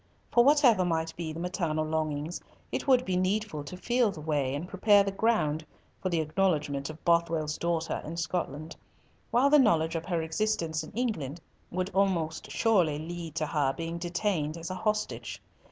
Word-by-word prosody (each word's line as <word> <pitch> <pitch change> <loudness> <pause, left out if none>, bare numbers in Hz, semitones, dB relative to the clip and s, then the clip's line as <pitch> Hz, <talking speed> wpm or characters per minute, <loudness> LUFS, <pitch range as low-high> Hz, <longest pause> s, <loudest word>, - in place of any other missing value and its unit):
For 240 - +6
whatever 270 -8 +5
might 165 -2 -1
be 165 -2 -4
the 160 - -6
maternal 170 -3 -1
longings, 155 +1 -2 0.3
it - - -3
would 255 -2 +4
be 185 - -1
needful 185 -3 0
to 180 +5 -7
feel 240 +3 +2
the 195 - -7
way 145 -3 -1
and 155 +5 -4
prepare 200 +2 +4
the 195 - -2
ground 195 -8 +1 0.4
for 185 - -1
the 170 -2 +1
acknowledgment 150 -4 0
of 155 0 -10
Bothwell's 165 -3 +1
daughter 170 -1 -1
in 165 +2 -6
Scotland, 165 -2 -3 0.5
while 265 +4 +3
the 300 - +7
knowledge 165 - +3
of 165 +1 -3
her 170 -3 0
existence 160 -2 -1
in 155 - -10
England 190 - -2 0.3
would 185 +2 -2
almost 180 -5 0
surely 180 -10 +2
lead 165 0 -6
to 160 -1 0
her 145 -3 +1
being 165 +2 -4
detained 175 -3 -1
as 165 +2 -6
a - - -3
hostage. 210 +2 -2
170 Hz, 175 wpm, -29 LUFS, 155-195 Hz, 0.5 s, the